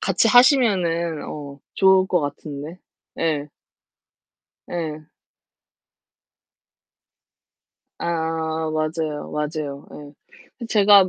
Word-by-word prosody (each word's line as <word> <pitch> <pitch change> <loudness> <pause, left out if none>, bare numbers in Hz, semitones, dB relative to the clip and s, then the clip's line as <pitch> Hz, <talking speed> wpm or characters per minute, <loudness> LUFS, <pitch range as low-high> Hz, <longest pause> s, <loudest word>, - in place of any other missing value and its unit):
같이 195 +4 +2
하시면은 190 - +4
어 140 -2 -7 0.2
좋을 190 -1 +5
거 180 -2 +1
같은데. 145 +3 -6 0.4
예. 150 -3 0 1.2
예. 155 -3 -5 2.9
아 160 -1 -2
맞아요 155 -1 -2
맞아요. 150 -2 -4 0.7
예. 235 - -5
제가 205 -3 +6
160 Hz, 135 characters per minute, -22 LUFS, 150-185 Hz, 2.9 s, 제가